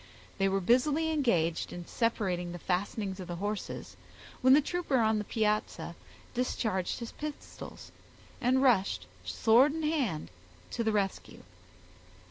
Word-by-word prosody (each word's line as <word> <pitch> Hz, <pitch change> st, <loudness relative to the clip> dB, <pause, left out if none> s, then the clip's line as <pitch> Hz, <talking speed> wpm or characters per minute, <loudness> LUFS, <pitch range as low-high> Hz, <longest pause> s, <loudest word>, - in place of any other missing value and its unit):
They 195 Hz, 0 st, +3 dB
were 195 Hz, 0 st, +1 dB
busily 290 Hz, -, +3 dB
engaged 180 Hz, -, +1 dB
in 175 Hz, -1 st, -7 dB
separating 185 Hz, -7 st, -1 dB
the -, -, -5 dB
fastenings 190 Hz, +2 st, -2 dB
of 185 Hz, -, -6 dB
the 175 Hz, -, -4 dB
horses, 205 Hz, +3 st, -4 dB, 0.5 s
when 260 Hz, 0 st, +7 dB
the 285 Hz, -, +8 dB
trooper 305 Hz, -2 st, 0 dB
on 220 Hz, -2 st, +3 dB
the -, -, -2 dB
piazza 215 Hz, 0 st, -1 dB, 0.4 s
discharged 220 Hz, -6 st, -1 dB
his 235 Hz, -1 st, -6 dB
pistols, 300 Hz, -1 st, -8 dB, 0.5 s
and 260 Hz, +1 st, +3 dB
rushed, 215 Hz, -7 st, +3 dB, 0.2 s
sword 255 Hz, +7 st, +4 dB
in 320 Hz, -, -3 dB
hand, 265 Hz, -, -1 dB, 0.4 s
to 230 Hz, -, -1 dB
the 220 Hz, -, +2 dB
rescue. 200 Hz, -2 st, -2 dB
220 Hz, 135 wpm, -31 LUFS, 190-260 Hz, 0.5 s, the